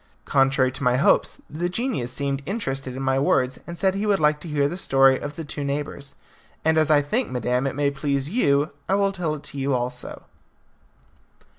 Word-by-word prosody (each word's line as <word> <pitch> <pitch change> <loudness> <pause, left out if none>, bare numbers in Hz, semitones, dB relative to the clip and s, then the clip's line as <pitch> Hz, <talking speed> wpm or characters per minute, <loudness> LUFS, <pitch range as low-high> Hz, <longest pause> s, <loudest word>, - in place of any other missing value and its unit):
Contrary 135 -1 +3
to 135 - -9
my 125 -2 +3
hopes, 140 - +3
the 170 +4 -3
genius 195 - -2
seemed 140 +1 -2
interested 135 - -3
in 135 - -4
my 135 0 +2
words, 130 -2 +1
and 170 0 -7
said 190 +1 +2
he 200 +2 -2
would 200 -2 +3
like 150 -1 +3
to 170 - -9
hear 145 -2 +1
the 160 - -4
story 135 -6 +4
of 145 0 -6
the 165 - -5
two 145 0 -4
neighbours; 140 0 -4 0.5
and 160 0 +4
as 155 -1 +3
I 145 -2 +5
think, 235 - -1
madam, 125 +1 0
it 135 - -3
may 145 0 +1
please 140 -1 -1
you, 145 - +2 0.2
I 195 - +3
will 200 0 +2
tell 175 -5 -2
it 145 - -10
to 140 - -8
you 135 0 +1
also. 125 0 -4
140 Hz, 205 wpm, -24 LUFS, 135-160 Hz, 0.5 s, I